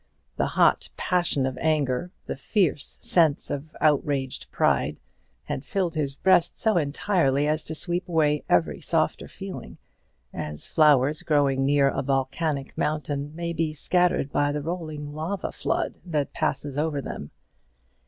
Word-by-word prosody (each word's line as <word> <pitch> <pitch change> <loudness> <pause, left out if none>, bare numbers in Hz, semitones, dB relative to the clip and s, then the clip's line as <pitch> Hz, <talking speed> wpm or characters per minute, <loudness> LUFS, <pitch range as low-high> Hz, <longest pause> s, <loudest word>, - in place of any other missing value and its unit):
The - - +1
hot - - +3
passion 175 -7 +1
of 130 -1 -3
anger, 155 0 +1 0.2
the - - -4
fierce 150 0 0
sense 160 -5 +2
of 145 +3 -5
outraged 140 -3 +1
pride, - - +1 0.5
had 130 - -4
filled 180 -2 -1
his 145 -4 -2
breast 180 +1 +3
so 220 -1 +2
entirely 145 -2 +1
as 155 +1 0
to 160 - -5
sweep 175 +3 -2
away 150 -3 +2
every 80 -5 +2
softer - - 0
feeling, - - -8 0.6
as 75 0 -5
flowers 150 -1 +4
growing 140 -3 +2
near 140 -1 +4
a - - 0
volcanic 135 +2 -1
mountain 150 -1 -2
may 170 0 -3
be 160 -1 -1
scattered 175 -3 +1
by 145 0 +2
the 145 0 -3
rolling 155 -3 -5
lava 165 +6 -3
flood - - -1
that 150 -6 -2
passes 145 -1 -2
over 155 -2 0
them. 75 - -6
150 Hz, 145 wpm, -26 LUFS, 140-165 Hz, 0.6 s, flowers